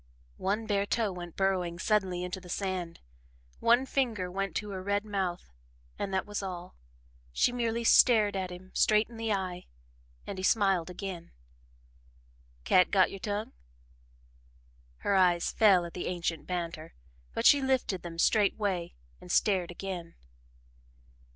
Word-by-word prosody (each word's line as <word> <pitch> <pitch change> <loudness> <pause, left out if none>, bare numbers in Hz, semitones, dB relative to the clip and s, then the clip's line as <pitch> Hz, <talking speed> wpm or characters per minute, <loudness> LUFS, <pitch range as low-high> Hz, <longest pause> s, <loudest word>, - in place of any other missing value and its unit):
One 210 +4 -1
bare 200 -2 0
toe 225 -2 0
went 175 -2 -8
burrowing 185 -3 0
suddenly 185 -1 0
into 180 +1 -5
the 180 - -13
sand, 185 -3 -3 0.6
one 240 +3 +4
finger 230 -10 -1
went 195 -1 -3
to 210 -1 -3
her 190 -1 -5
red 200 +2 -1
mouth 190 - -3 0.5
and 195 - -3
that 190 0 0
was 205 0 -4
all. 180 -2 -7 0.6
She 245 - +2
merely 235 -1 -1
stared 220 -3 +5
him 185 0 -5
straight 215 +1 +3
in 235 - -11
the 225 -1 -2
eye 185 -3 -3 0.6
and 190 - -6
he - - -5
smiled 195 -4 +2
again. 180 -2 -6 1.3
"Cat 180 - +4
got 190 -2 +4
your 195 - -7
tongue?" 205 +2 -3 1.5
Her - - 0
eyes 180 -3 +3
fell 195 -6 +5
at 170 - -9
the 180 - -4
ancient 170 -2 -3
banter, 170 -3 -4 0.4
but - - -1
she 285 - +7
lifted 260 -8 0
them 170 -1 -8
straightway 200 -2 +1 0.2
and 180 - -9
stared 185 -4 +2
again. 175 -2 -6
190 Hz, 145 wpm, -30 LUFS, 180-210 Hz, 1.5 s, she